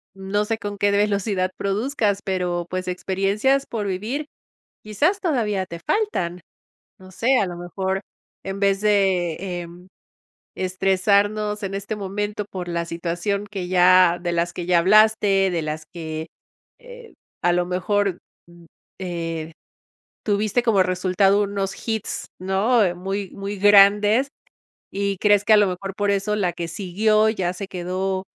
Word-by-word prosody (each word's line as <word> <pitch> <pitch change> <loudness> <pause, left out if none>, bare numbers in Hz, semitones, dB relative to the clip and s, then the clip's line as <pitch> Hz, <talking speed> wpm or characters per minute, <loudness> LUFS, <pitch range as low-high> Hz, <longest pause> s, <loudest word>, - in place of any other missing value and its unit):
no 195 +2 -1
sé 225 +1 -1
con 205 -1 -5
qué 205 0 +2
velocidad 200 -2 0
produzcas, 205 0 0
pero, 180 -2 -2
pues, 185 0 -4
experiencias 195 +9 0
por 210 -3 -4
vivir, 225 +11 -3 0.6
quizás 290 - 0
todavía 225 - 0
te 170 -1 -8
faltan. 180 - -1 0.6
No 185 0 -14
sé, 255 +7 +2
a 200 - +1
lo 175 -1 -6
mejor, 190 +2 -3 0.4
en 195 +1 -5
vez 195 0 +2
de, 190 -5 +2 0.3
em, 175 +2 -13 0.7
estresarnos 200 +3 +1
en 195 0 -3
este 200 +2 -3
momento 205 +1 -4
por 180 -2 -6
la 170 -1 -2
situación 175 +4 -3
que 190 -4 -5
ya 180 -1 +5
de 175 -1 -2
las 170 0 -1
que 175 - -5
ya 175 -1 +4
hablaste, 205 0 +4
de 170 -2 -1
las 155 0 -5
que, 160 -1 -5 0.5
eh, 485 -1 -13 0.3
a 175 - +3
lo 175 0 +1
mejor, 185 +1 0 0.3
mm, 170 0 -17 0.3
eh, 165 -3 -4 0.7
tuviste 210 +3 +1
como 215 -6 +3
resultado 185 +2 +2
unos 195 -1 -3
hits, 220 -2 -2
¿no?, 190 +1 +2
muy 195 +2 -4
muy 200 +1 -6
grandes 205 +4 +5 0.7
y 200 -1 -2
crees 205 -1 +3
que 220 - +3
a - - +8
lo 205 - +4
mejor 195 +1 -4
por 205 0 0
eso 200 +1 0
la 180 -4 0
que 170 -1 -4
siguió 215 +5 +1
ya 190 -5 -1
se 195 +2 -6
quedó, 185 +1 -3
195 Hz, 150 wpm, -22 LUFS, 180-210 Hz, 0.7 s, a